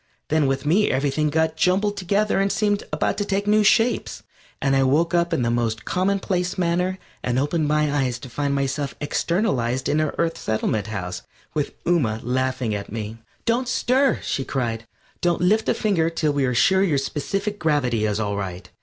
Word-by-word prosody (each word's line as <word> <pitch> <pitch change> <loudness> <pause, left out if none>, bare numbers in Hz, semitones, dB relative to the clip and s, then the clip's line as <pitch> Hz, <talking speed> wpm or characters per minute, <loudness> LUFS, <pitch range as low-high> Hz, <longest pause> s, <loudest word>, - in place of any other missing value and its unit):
Then 155 -2 +2
with 135 +1 -1
me 190 +8 +3
everything 145 +3 +1
got 160 +1 +1
jumbled 190 +5 +2
together 200 +2 +1
and 195 0 +2
seemed 205 -1 +1
about - - 0
to - - +1
take 200 0 -1
new 210 +1 +4
shapes, 225 +3 +2 0.4
and 135 -1 +1
I 135 - +4
woke 155 +6 +2
up 170 0 +2
in 125 - +1
the 115 - +1
most 115 -2 -1
commonplace 185 -1 0
manner 180 +1 0 0.2
and 125 0 -1
opened 150 +3 +1
my 150 -1 +1
eyes 130 -4 0
to 130 - -10
find 140 +3 -1
myself 140 +1 -2
externalized 140 - 0
in 155 - +2
our 155 - -1
Earth 165 -1 0
Settlement 110 -1 -1
House 90 -4 -4 0.3
with 150 -2 -2
Ooma 130 -11 +1
laughing 130 -2 -1
at 100 -1 -5
me. 110 +1 -5 0.3
"Don't 240 +2 +1
stir!" 260 +2 +2
she 135 - -1
cried. 115 -4 -3 0.3
"Don't 175 -1 +1
lift 210 +5 +2
a - - +2
finger 175 -7 +1
till 155 -3 0
we 140 -2 +1
are 125 -1 0
sure 190 +10 +4
your 170 -7 +2
specific 195 +9 -2
gravity 125 -8 +1
is 105 0 -1
all 100 -2 -1
right." 95 -2 -5
150 Hz, 190 wpm, -23 LUFS, 125-185 Hz, 0.4 s, new